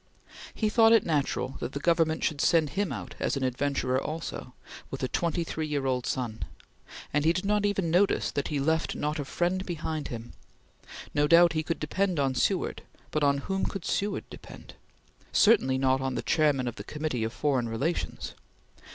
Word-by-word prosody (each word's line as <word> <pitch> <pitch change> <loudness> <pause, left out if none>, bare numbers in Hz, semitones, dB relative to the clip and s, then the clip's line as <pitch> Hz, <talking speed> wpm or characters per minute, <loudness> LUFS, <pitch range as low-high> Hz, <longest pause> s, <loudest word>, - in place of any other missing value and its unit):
He 215 - 0
thought 225 +1 +5
it 225 - +5
natural 140 -4 -1
that - - -4
the 140 - -3
Government 165 0 +2
should 145 -3 0
send 160 -4 +3
him 200 +2 -1
out - - -6
as - - 0
an 135 - -2
adventurer 130 0 0
also, 155 -5 -5 0.3
with 135 - -6
a - - +2
twenty 170 +4 -1
three 160 -1 -3
year 145 -2 -1
old 125 -2 0
son, 115 -4 -3 0.7
and 145 0 +2
he 160 - +4
did 185 +3 -2
not 205 0 +2
even 195 -5 0
notice 190 +4 +2
that 140 - -2
he 150 -2 -1
left 160 +3 0
not 150 +1 -2
a 145 - -3
friend 175 +6 -1
behind 160 -4 -4
him. 115 0 -7 0.8
No 145 0 +3
doubt 170 +1 +6
he 155 - 0
could 165 +1 -3
depend 185 +2 0
on 135 -2 +1
Seward, 125 - 0 0.3
but 155 - 0
on 140 -1 +3
whom 190 0 -1
could 195 -4 -5
Seward 200 0 -1
depend? - - -11 0.6
Certainly 135 - +4
not 130 0 +2
on 130 -1 -2
the - - -3
Chairman 145 -5 +2
of 120 - -4
the 100 - -6
Committee 150 -2 -3
of 110 - -2
Foreign 130 -4 0
Relations. 140 +10 -2
150 Hz, 190 wpm, -28 LUFS, 135-170 Hz, 0.8 s, doubt